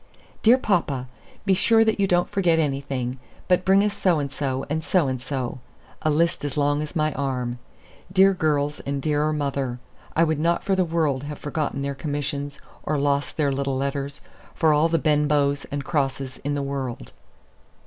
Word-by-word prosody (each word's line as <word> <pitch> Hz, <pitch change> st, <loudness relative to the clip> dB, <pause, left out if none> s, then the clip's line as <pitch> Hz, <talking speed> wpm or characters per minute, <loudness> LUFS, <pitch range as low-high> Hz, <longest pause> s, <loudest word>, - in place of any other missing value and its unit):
"Dear 235 Hz, +3 st, +6 dB
papa, 150 Hz, -, 0 dB, 0.4 s
be 195 Hz, -, +4 dB
sure 225 Hz, +4 st, +4 dB
that 220 Hz, -2 st, +1 dB
you 195 Hz, -, +3 dB
don't 175 Hz, -1 st, +2 dB
forget 180 Hz, -5 st, +2 dB
anything, 135 Hz, -4 st, -2 dB, 0.3 s
but 180 Hz, 0 st, +3 dB
bring 195 Hz, +2 st, +5 dB
us 210 Hz, -1 st, 0 dB
so 180 Hz, -4 st, +2 dB
and 140 Hz, -2 st, -2 dB
so, 135 Hz, -2 st, -2 dB
and 160 Hz, +2 st, -2 dB
so 175 Hz, -4 st, +2 dB
and 130 Hz, -2 st, -2 dB
so," 130 Hz, -2 st, -3 dB, 0.4 s
a 155 Hz, -, +1 dB
list 165 Hz, +2 st, +1 dB
as 145 Hz, 0 st, -3 dB
long 145 Hz, 0 st, +2 dB
as 150 Hz, -, -6 dB
my 155 Hz, -1 st, +1 dB
arm. 125 Hz, -3 st, -2 dB, 0.5 s
Dear 195 Hz, +1 st, +6 dB
girls 150 Hz, -4 st, 0 dB
and 140 Hz, 0 st, -3 dB
dearer 150 Hz, +1 st, +1 dB
mother! 140 Hz, -4 st, -2 dB, 0.4 s
I 165 Hz, -, +5 dB
would 160 Hz, -2 st, +1 dB
not 170 Hz, +2 st, +1 dB
for 195 Hz, -1 st, +1 dB
the 185 Hz, -, +3 dB
world 155 Hz, -5 st, 0 dB
have 150 Hz, 0 st, -6 dB
forgotten 145 Hz, -2 st, -3 dB
their 140 Hz, 0 st, -2 dB
commissions, 145 Hz, -1 st, -4 dB, 0.2 s
or 150 Hz, -, -1 dB
lost 140 Hz, 0 st, 0 dB
their 145 Hz, -3 st, +2 dB
little 135 Hz, 0 st, -1 dB
letters, 140 Hz, +1 st, -3 dB, 0.3 s
for 160 Hz, -2 st, +4 dB
all 155 Hz, +3 st, +3 dB
the 165 Hz, -, +2 dB
Benbows 145 Hz, -2 st, +2 dB
and 140 Hz, -1 st, -4 dB
Crosses 135 Hz, -4 st, -2 dB
in 145 Hz, +1 st, -1 dB
the 140 Hz, -, -1 dB
world. 130 Hz, -, -4 dB
145 Hz, 185 wpm, -24 LUFS, 140-165 Hz, 0.5 s, Dear